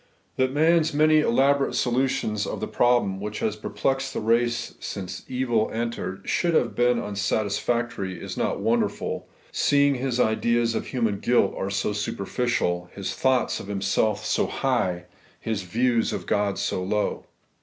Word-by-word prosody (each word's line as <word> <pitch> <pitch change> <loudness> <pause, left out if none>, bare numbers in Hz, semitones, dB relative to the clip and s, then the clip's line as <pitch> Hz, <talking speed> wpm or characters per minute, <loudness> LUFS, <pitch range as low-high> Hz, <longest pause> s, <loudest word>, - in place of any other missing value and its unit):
That 130 0 +1
man's 160 +1 +3
many 155 +1 +5
elaborate 140 +1 +2
solutions 120 -4 0
of - - -4
the - - -3
problem 120 -6 +2
which 105 +1 -4
has 110 -1 -1
perplexed 135 +5 -2
the - - 0
race 120 +2 +1
since 95 -1 -6
evil 120 -4 0
entered 110 -5 -4
should 170 -2 +1
have 120 - +2
been 120 0 +3
unsatisfactory, 100 0 -1
is - - -6
not - - -1
wonderful, - - -1 0.2
seeing 140 0 +3
his 125 -1 -2
ideas 115 +1 +2
of - - -3
human 115 -6 -1
guilt 120 -4 +2
are 95 - -3
so 100 +1 -1
superficial; 100 -3 -1
his 100 -2 -3
thoughts 130 -2 +1
of - - -8
himself 100 +1 0
so - - +1
high; 95 -10 -1 0.3
his 110 -3 -2
views 115 +5 +1
of - - -4
God 100 -2 0
so - - -1
low. 105 +3 -1
115 Hz, 150 wpm, -25 LUFS, 100-130 Hz, 0.3 s, many